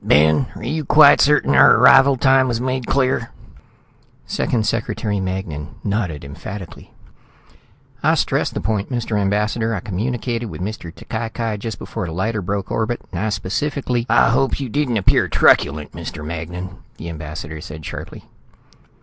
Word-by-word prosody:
"Ben, 80 - +4
are - - -9
you 155 0 -2
quite 145 +1 +6
certain 150 - +3
our 65 - +7
arrival 135 0 +6
time 130 0 +4
was 120 -2 -1
made 130 -1 -2
clear?" 130 -3 +1 1.0
Second 110 -3 -1
Secretary 110 -2 -1
Magnan 85 -7 -5
nodded 100 -9 -2
emphatically. 90 +6 -9 1.1
"I - - +3
stressed - - 0
the - - -2
point, 105 -2 -2
Mr. 120 -3 -2
Ambassador. 105 +3 0
I - - -2
communicated 115 +5 -3
with - - -8
Mr. 95 -3 -5
T'Cai 110 +5 -5
Cai 115 -3 -2
just 110 0 -5
before 90 - -5
the 80 - -6
lighter 105 +5 -1
broke 100 +1 -3
orbit, 115 +1 -1
and 90 - -4
I 110 - 0
specifically 120 +4 -2
" - - -34
"I - - +4
hope 135 +3 +1
you 135 -3 -4
didn't 125 -1 0
appear 100 - +3
truculent, 75 +1 +3
Mr. 75 - -7
Magnan," 90 +3 -6 0.2
the 85 - -8
ambassador 80 -1 -7
said 75 -1 -9
sharply. - - -8
105 Hz, 160 wpm, -20 LUFS, 90-120 Hz, 1.1 s, our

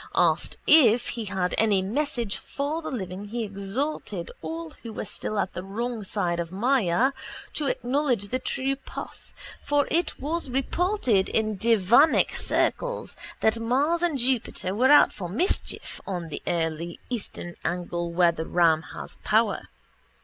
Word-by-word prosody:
Asked - - +2
if 245 -6 +6
he 230 -2 -4
had 190 -2 -1
any 205 -4 +3
message 240 0 -1
for 290 +4 -3
the - - -5
living 190 -4 -5
he 230 +3 -3
exhorted 200 - -3
all 160 0 -5
who 230 - -7
were - - -4
still 215 - -4
at 195 -2 -1
the 180 - -5
wrong 225 +3 -3
side 180 -3 -1
of 170 -1 -2
Māyā 235 +2 +2 0.4
to 295 - -1
acknowledge 245 -5 0
the 255 - -1
true 265 +1 -1
path 270 - -9 0.3
for 290 -1 +2
it 340 +2 0
was 310 +1 -2
reported 270 - +1
in 215 -1 +1
devanic 230 - +4
circles - - -1 0.3
that 220 +1 +3
Mars 280 +9 +1
and 340 -5 +1
Jupiter 240 -7 -1
were 250 +6 +3
out 295 - +7
for 180 -3 -6
mischief 300 - -1
on 175 -4 -4
the - - -5 0.7
eastern 205 -6 -4
angle 175 -1 -2
where 170 0 +4
the 160 -1 -5
ram 165 -3 +4
has - - -7
power. - - +1
225 Hz, 150 wpm, -26 LUFS, 185-270 Hz, 0.7 s, out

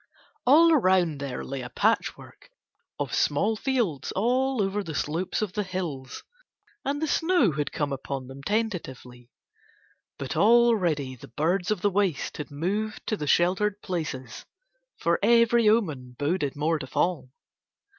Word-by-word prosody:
All 325 +5 +7
round 185 - +2
there 135 -3 -5
lay 135 -1 -5
a 125 - -7
patchwork 220 - -1 0.5
of - - -3
small 220 +2 +1
fields 215 - -1
all 255 +5 +1
over 200 +1 0
the 160 -4 -6
slopes 170 +9 -1
of 195 -4 -4
the 210 - -1
hills, 175 -9 -5 0.6
and 285 +1 -1
the 315 - -1
snow 325 - +2
had 150 0 -3
come 145 -2 -2
upon 135 0 -5
them 135 +2 -10
tentatively, 135 - -3 0.9
but - - -5
already 200 - +3
the 120 - -13
birds 170 - -1
of 215 -4 0
the 205 - +2
waste 190 -7 -1
had 150 - -6
moved 200 +9 -3
to 215 - -1
the 150 -7 -5
sheltered 190 +6 +2
places 135 - -5 0.5
for - - +1
every 235 -1 +4
omen 150 - 0
boded 145 -1 -1
more 155 +2 0
to 130 - -7
fall. 170 -2 -1
180 Hz, 145 wpm, -26 LUFS, 145-215 Hz, 0.9 s, All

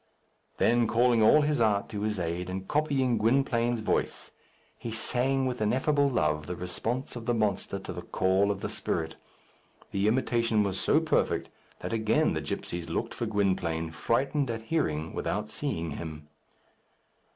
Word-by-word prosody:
Then 120 0 +3
calling 120 0 +3
all 130 +8 +6
his 145 -4 +1
art 105 -3 +2
to 105 -2 -4
his 105 -2 -1
aid, 85 +1 -2
and 95 +1 -5
copying 135 -5 +1
Gwynplaine's 120 -1 +2
voice, - - -1 0.5
he 115 - -5
sang 130 +4 +1
with 125 -3 -2
ineffable 140 +6 +2
love 75 - 0
the 90 - -3
response 115 +10 -3
of 120 -1 -7
the 120 - +2
monster 105 -2 0
to 95 - -7
the - - -6
call 95 +2 +1
of 100 -1 -2
the - - -2
spirit. 80 -1 -2 0.8
The 100 +1 +1
imitation 115 -2 +2
was 95 -2 -1
so - - +3
perfect - - 0 0.3
that - - -4
again 110 -1 +2
the - - -2
gipsies 85 -1 -5
looked - - -2
for 120 - -3
Gwynplaine, 90 -6 0
frightened 130 - 0
at 115 -1 -3
hearing 80 - 0
without - - -2
seeing 80 -1 -3
him. 75 0 -7
110 Hz, 160 wpm, -28 LUFS, 95-120 Hz, 0.8 s, all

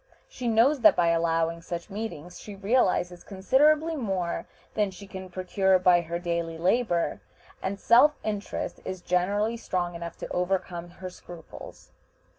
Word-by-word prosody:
She 250 - -6
knows 235 +6 +4
that - - +6
by 175 -1 +3
allowing 165 0 +1
such 170 +2 -6
meetings 180 -5 -6
she 205 - -9
realizes 195 -4 +1
considerably 295 - +2
more 190 - -2 0.3
than 210 -2 +1
she 195 +2 -11
can 190 -1 -8
procure 185 +1 +2
by 180 -1 +4
her 170 0 -4
daily 170 -1 -3
labor, 180 0 +1 0.4
and 195 +1 -3
self 290 +6 +6
interest 205 -2 -4
is 185 -1 -5
generally 200 +6 0
strong 180 -5 -2
enough 170 0 -7
to - - -6
overcome 180 -1 -2
her 185 +1 -8
scruples. 175 -2 -12
185 Hz, 145 wpm, -27 LUFS, 175-210 Hz, 0.4 s, that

